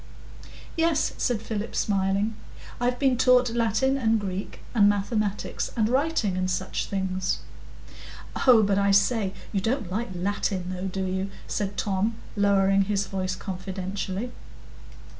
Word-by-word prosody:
"Yes," 330 -2 +2
said 230 -4 0
Philip, 220 0 -4
smiling; 200 +2 +1 0.4
"I've 245 +1 +1
been 260 -2 +2
taught 250 -1 +5
Latin 235 +4 +2
and 225 -2 +2
Greek 195 -1 -5
and 205 -4 +6
mathematics, 205 0 -1
and 215 -2 +3
writing 260 - +1
and 185 0 0
such 185 +1 -2
things." 190 -1 -1 1.1
"Oh, 235 -4 +8
but 200 -1 +2
I 200 0 +3
say, 200 0 +3 0.2
you 195 - 0
don't 225 -3 -1
like 220 +4 -2
Latin, 185 0 -1
though, 185 +1 -3
do 190 0 -2
you?" 190 +1 -2 0.2
said 200 -1 -3
Tom, 205 +2 0 0.2
lowering 195 -1 +3
his 200 0 0
voice 185 -1 -2
confidentially. 190 +3 -4
200 Hz, 135 wpm, -26 LUFS, 190-230 Hz, 1.1 s, Oh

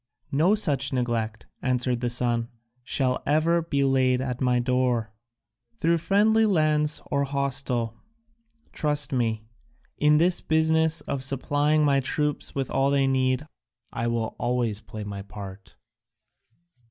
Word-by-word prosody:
"No 165 +9 +3
such 150 - +1
neglect," 115 -4 -2 0.2
answered 125 -1 0
the 120 - 0
son, 120 -1 +1 0.4
"shall 130 0 0
ever 160 +3 +2
be 140 -4 -1
laid 130 -2 +2
at 125 -1 -4
my 125 -1 +2
door. 120 -3 0 0.6
Through 170 -4 +2
friendly 215 +5 +3
lands 155 -5 +1
or 140 -1 +1
hostile, 135 -4 -2 0.8
trust 150 -2 0
me, 115 -3 0 0.6
in 150 +1 +4
this 175 +3 +2
business 160 0 +2
of 140 -2 -4
supplying 145 +3 +1
my 140 -1 +3
troops 150 +2 -2
with 135 -2 -2
all 135 +1 +2
they 140 -1 +2
need 130 +1 +1 0.5
I 115 +1 -2
will 115 -1 -2
always 120 -4 -1
play 110 -1 -8
my 100 -1 -6
part." 100 -1 -10
135 Hz, 130 wpm, -25 LUFS, 120-150 Hz, 0.8 s, in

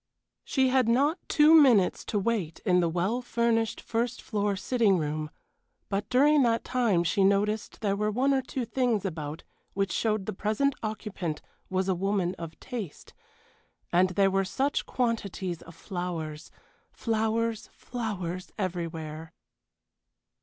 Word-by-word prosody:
She 265 -2 +2
had 255 -3 +3
not 285 +8 +3
two 300 +1 +6
minutes 250 - +5
to 210 - -1
wait 200 -6 -1
in 180 -3 +4
the 170 -1 +2
well 185 +9 0
furnished 235 -2 0
first 235 +1 -2
floor 205 -1 -1
sitting 210 -1 +2
room, 155 -1 -2 0.6
but 200 +1 -2
during 290 +3 +5
that 230 -2 +2
time 230 -9 +2
she 175 +4 +2
noticed 205 +2 +1
there 200 -2 +1
were 210 +1 0
one 260 +6 +2
or 265 - +2
two 255 -1 -4
things 235 -5 0
about 155 -3 -5 0.3
which 195 -2 0
showed 215 +1 0
the - - -3
present 215 +9 +1
occupant 210 -7 -4 0.3
was 185 0 0
a 190 - +3
woman 190 -1 0
of 165 -1 -8
taste, 230 - -7 0.8
and 185 +2 +4
there 195 +1 +2
were 195 0 +2
such 270 +9 -1
quantities 200 -8 -2
of 165 - -13
flowers. 165 -5 -5 0.4
Flowers, 225 0 -1
flowers, 190 -7 -5
everywhere. 165 -4 -4
205 Hz, 140 wpm, -28 LUFS, 180-235 Hz, 0.8 s, two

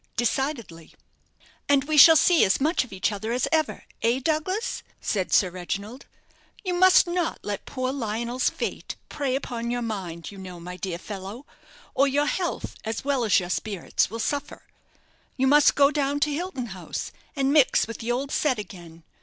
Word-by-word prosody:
"Decidedly." 240 - -2 0.7
"And 280 -1 +4
we 310 +2 -1
shall 320 +2 +10
see 325 +2 +5
as 190 - +3
much 310 +3 +2
of 250 - -14
each 190 +2 -1
other 215 +2 -4
as 245 +1 0
ever 315 -2 0 0.2
eh, 235 +3 +2
Douglas?" 330 - -1 0.2
said 190 -4 -2
Sir 185 -3 +4
Reginald. 200 +7 -6 0.6
"You 365 -3 -1
must 370 +1 +6
not 345 -1 -1
let 205 -1 -5
poor 255 -1 -2
Lionel's 235 0 -1
fate - - -5
prey 275 -3 -1
upon 235 -3 -4
your 245 0 -2
mind, 185 -7 -5
you 200 - -11
know, 180 -2 -9
my 180 +1 -8
dear 180 -1 -4
fellow; 200 +7 -8 0.5
or 275 - +3
your 285 +2 +1
health, 350 +3 -3
as 220 +4 -4
well 275 -3 +1
as 215 -3 +4
your 180 -1 -5
spirits, 200 -3 -1
will 225 - -6
suffer. 285 +5 -3 0.7
You 265 - +2
must 290 +2 +5
go 280 0 +5
down 285 -1 0
to 295 0 +2
Hilton 310 -5 -4
House, 185 - -6 0.2
and 275 0 +1
mix 295 -4 +4
with 230 - -8
the 235 +1 -2
old 270 +3 -2
set 275 -5 +1
again. 170 -5 -10
250 Hz, 180 wpm, -25 LUFS, 200-290 Hz, 0.7 s, shall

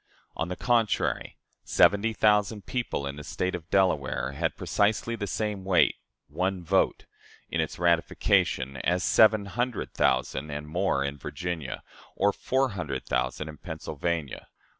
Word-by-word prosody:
On 80 - -2
the 90 - -4
contrary, 115 -2 0 0.3
seventy 100 +6 +4
thousand 105 -1 +2
people 120 - -2
in 70 +1 -5
the 75 - -7
State 90 +5 -2
of 85 -1 -6
Delaware 70 -10 +1
had 80 +4 -2
precisely 110 +3 +1
the 105 -3 -4
same 105 0 -2
weight 95 -2 +4 0.3
one 90 +5 -2
vote 95 +3 +1 0.5
in - - +1
its - - -4
ratification, 85 -5 +1
as 90 +7 0
seven 110 +2 +5
hundred 120 +4 -3
thousand 65 +3 +1
(and 75 +1 -5
more) 90 -3 0
in 70 +1 -4
Virginia, 85 -3 -5 0.3
or 100 +1 +2
four 130 0 0
hundred 80 - -4
thousand 75 - -1
in 75 -1 -9
Pennsylvania. 80 -2 -4
90 Hz, 140 wpm, -27 LUFS, 75-100 Hz, 0.5 s, seven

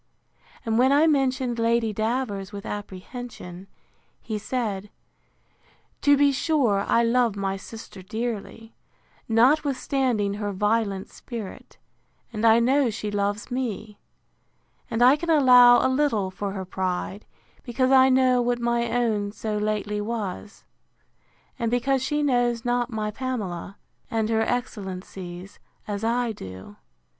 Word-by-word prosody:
And 225 0 +1
when 260 +2 +4
I 290 +3 +5
mentioned 260 -5 +1
Lady 230 -1 +1
Davers 215 -3 -2
with 200 -1 -8
apprehension, 195 -2 -8 0.5
he 215 -2 -4
said, 210 -4 -3 1.1
To 285 -1 +5
be 285 0 +4
sure 265 -8 +1
I 235 - +3
love 235 -2 +2
my 195 -1 -2
sister 205 0 -10
dearly, 225 +2 -5 0.6
notwithstanding 255 -3 +2
her 205 0 -3
violent 205 -1 0
spirit; 225 -6 -9 0.6
and 215 +1 -1
I 225 0 +6
know 260 +2 +3
she 210 -1 -4
loves 205 +3 -2
me; 220 -4 -4 0.9
and 230 +1 +1
I 255 +3 +7
can 340 +2 -5
allow 250 -5 +7
a - - +5
little 260 -8 +1
for 195 +1 -4
her 190 -2 -5
pride, 185 +2 -3 0.4
because 255 +1 0
I 265 0 +7
know 255 -1 +4
what 245 0 0
my 235 0 0
own 225 -4 0
so 215 0 -4
lately 210 0 -1
was; 210 -2 -5 1.0
and 230 -2 0
because 255 +3 +1
she 295 +2 0
knows 245 -4 +1
not 245 0 0
my 215 -2 -3
Pamela, 205 -7 -4 0.3
and 225 -1 -1
her 225 -1 +2
excellencies, 190 -5 -5 0.3
as 205 0 -4
I 235 +1 +1
do. 95 - -10
225 Hz, 130 wpm, -25 LUFS, 205-250 Hz, 1.1 s, I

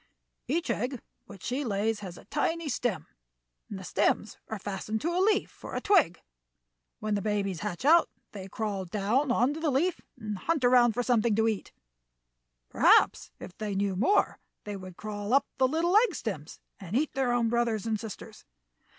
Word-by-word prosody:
"Each 340 +1 0
egg 250 +3 -2 0.3
which 195 -4 -12
she 260 +4 -2
lays 215 -1 0
has 185 -4 -8
a - - -14
tiny 325 +2 -1
stem, 240 - -1 0.6
and 205 - -5
the 190 - -8
stems 205 +3 0
are 220 - -4
fastened 205 +2 -4
to 335 +3 -1
a 365 - +2
leaf 410 +1 +1
or - - -4
twig. 350 - +3 0.8
When 215 0 -2
the 200 - 0
babies 200 -4 -1
hatch 175 +9 -4
out 330 +3 +6 0.2
they 195 -2 -8
crawl 200 -2 -3
down 215 +9 0
onto 260 +6 +2
the 320 -1 0
leaf 315 +7 +1 0.2
and 210 -3 -5
hunt 310 - 0
around 245 -2 +5
for 245 - -1
something 235 -3 +2
to 220 +1 +2
eat. 215 -3 -2 1.0
Perhaps - - +4
if 180 - -10
they 210 -2 -3
knew 195 -1 0
more 325 - +2 0.2
they 205 -1 -5
would 185 -2 -9
crawl 210 +2 -2
up 280 - +4
the 260 - +5
little 330 +6 +1
egg 435 -3 +5
stems 170 -9 -5 0.2
and 195 +1 -6
eat 295 +4 +1
their 265 -3 +1
own 240 -1 +2
brothers 230 -3 0
and 220 -2 -1
sisters." 220 -3 -9
225 Hz, 180 wpm, -29 LUFS, 200-270 Hz, 1.0 s, out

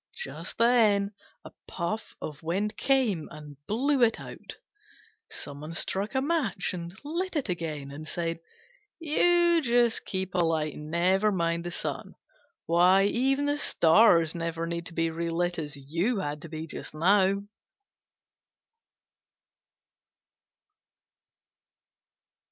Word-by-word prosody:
Just 485 - -7
then 215 -4 +3 0.3
a - - -10 0.2
puff 190 +5 -4
of 150 -2 -7
wind 195 +6 -2
came 240 - +1
and 150 -2 -12
blew 265 +5 +1
it 230 -1 +3
out. - - -10 0.7
Some 145 0 -7
one 155 +2 -7
struck 200 +7 -1
a 265 - +2
match 260 - 0
and 175 +1 -7
lit 345 +4 -3
it 280 -8 -1
again, 155 -5 -4
and 155 +2 -8
said, 165 0 -3 0.6
"You 345 +1 +3
just 240 -3 +2
keep 190 -1 -3
alight, 165 -4 +1
and 150 0 -9
never 185 +5 +2
mind 170 -2 -1
the - - -2
sun. - - -5 0.5
Why, 180 +3 +5
even 270 +7 +1
the 290 0 0
stars 165 - +4
never 165 -1 -3
need 170 0 -4
to - - -11
be 165 0 0
relit 170 +1 -1
as 150 -2 -5
you 170 - -1
had 150 -5 -3
to 165 - -9
be 160 0 -5
just 155 - -7
now." 195 +4 +3
180 Hz, 125 wpm, -28 LUFS, 165-230 Hz, 0.7 s, Why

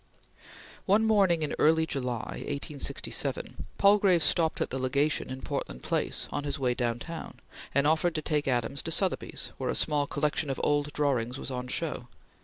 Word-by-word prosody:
One 210 +3 +4
morning 195 -7 +3
in 150 - -2
early 160 +1 +4
July, 125 -7 -3
1867, 145 0 -2
Palgrave 200 -4 +5
stopped 160 +2 +3
at - - -2
the 135 - -2
Legation 140 +4 0
in 130 0 -6
Portland - - -5
Place - - 0
on 145 - -3
his 145 0 -2
way 125 -3 +1
downtown, 120 +7 -4 0.4
and 140 - +3
offered 160 +2 +2
to 155 - -1
take 150 -2 -1
Adams 125 +2 +1
to 165 - -4
Sotheby's, 185 +3 0
where - - -2
a - - 0
small 145 -2 +2
collection 150 0 -1
of 135 - -2
old 145 0 +1
drawings 130 -4 0
was 135 - -5
on 125 0 -4
show. 130 -3 -3
145 Hz, 170 wpm, -28 LUFS, 130-160 Hz, 0.4 s, Palgrave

